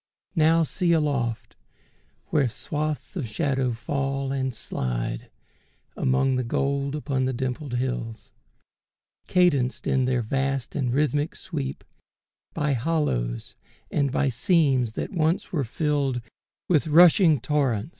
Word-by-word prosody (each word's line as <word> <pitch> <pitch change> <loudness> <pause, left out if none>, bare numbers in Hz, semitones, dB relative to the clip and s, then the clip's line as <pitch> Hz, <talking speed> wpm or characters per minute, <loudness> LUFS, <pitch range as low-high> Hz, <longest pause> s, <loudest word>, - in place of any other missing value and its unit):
Now 165 0 +4
see 170 +2 0
aloft 140 -8 -1 0.7
Where 140 -5 +2
swaths 150 - -4
of 150 -10 -3
shadow 135 +1 0
fall 135 +3 -2
and 130 -1 -1
slide - - -4 0.7
Among 130 0 +2
the 125 - 0
gold 140 +3 -1
upon 140 -3 -1
the 130 - -1
dimpled 130 +1 -3
hills, 120 -3 -3 1.0
Cadenced 145 -9 +2
in 130 -1 +2
their 125 -2 +1
vast 135 +1 -1
and 130 -5 0
rhythmic 145 +2 0
sweep, 65 0 -5 0.7
By 150 -1 +1
hollows 115 - -1 0.4
and 140 -2 +1
by 140 +1 +1
seams 130 - +2
that - - -4
once 165 -1 0
were 155 -6 0
filled 140 0 -1 0.5
With 160 -3 +2
rushing 165 -1 +6
torrents. 130 -3 0
135 Hz, 120 wpm, -25 LUFS, 125-150 Hz, 1.0 s, rushing